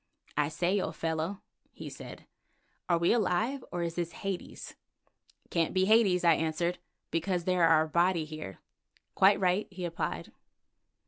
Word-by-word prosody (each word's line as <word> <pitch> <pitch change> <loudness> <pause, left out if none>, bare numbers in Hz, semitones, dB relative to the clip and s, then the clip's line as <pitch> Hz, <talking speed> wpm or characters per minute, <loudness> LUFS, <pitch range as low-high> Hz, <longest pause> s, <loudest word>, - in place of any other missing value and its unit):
"I 150 0 +1
say, 180 +5 0
old - - -4
fellow," 165 +4 -2 0.3
he - - -9
said, - - -10 0.6
"are 170 - +4
we 170 +4 +3
alive, 235 +5 0
or 175 -1 -2
is 170 -1 -2
this 170 -1 -3
Hades?" 195 -1 -6 0.8
"Can't 165 0 0
be 185 0 +3
Hades," 200 -4 +4
I 170 -1 +6
answered, 165 +3 -1 0.3
"because 175 +1 -1
there 180 -1 +3
are 155 -1 +5
Abati 170 +1 +1
here." 155 -12 -8 0.6
"Quite 195 +1 +5
right," 185 +2 +1
he 185 -2 -6
replied. 85 - -4
175 Hz, 145 wpm, -30 LUFS, 165-190 Hz, 0.8 s, I